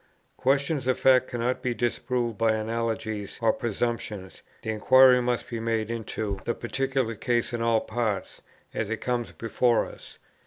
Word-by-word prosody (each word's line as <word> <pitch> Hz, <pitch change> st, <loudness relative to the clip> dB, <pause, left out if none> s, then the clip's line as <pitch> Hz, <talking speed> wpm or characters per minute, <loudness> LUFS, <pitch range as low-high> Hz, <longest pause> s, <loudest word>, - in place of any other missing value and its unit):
Questions 140 Hz, +1 st, +1 dB
of 130 Hz, -, +2 dB
fact 130 Hz, -1 st, +5 dB
cannot 125 Hz, +1 st, -1 dB
be 125 Hz, -2 st, -1 dB
disproved 120 Hz, -1 st, -1 dB
by 115 Hz, +1 st, +2 dB
analogies 110 Hz, -2 st, -3 dB
or 115 Hz, -1 st, +3 dB
presumptions; 110 Hz, -4 st, -3 dB, 0.2 s
the 110 Hz, -, -2 dB
inquiry 125 Hz, +3 st, +6 dB
must 120 Hz, -1 st, -1 dB
be 115 Hz, -, -4 dB
made 115 Hz, -1 st, -1 dB
into 110 Hz, -3 st, -3 dB
the 120 Hz, -, -1 dB
particular 130 Hz, -1 st, -1 dB
case 120 Hz, +2 st, -1 dB
in 120 Hz, -, -2 dB
all 115 Hz, -1 st, +2 dB
its -, -, -15 dB
parts, 110 Hz, -5 st, -2 dB, 0.3 s
as 110 Hz, -, -2 dB
it 115 Hz, -, -1 dB
comes 120 Hz, -2 st, -2 dB
before 115 Hz, 0 st, +1 dB
us. -, -, -12 dB
115 Hz, 160 wpm, -27 LUFS, 110-125 Hz, 0.3 s, inquiry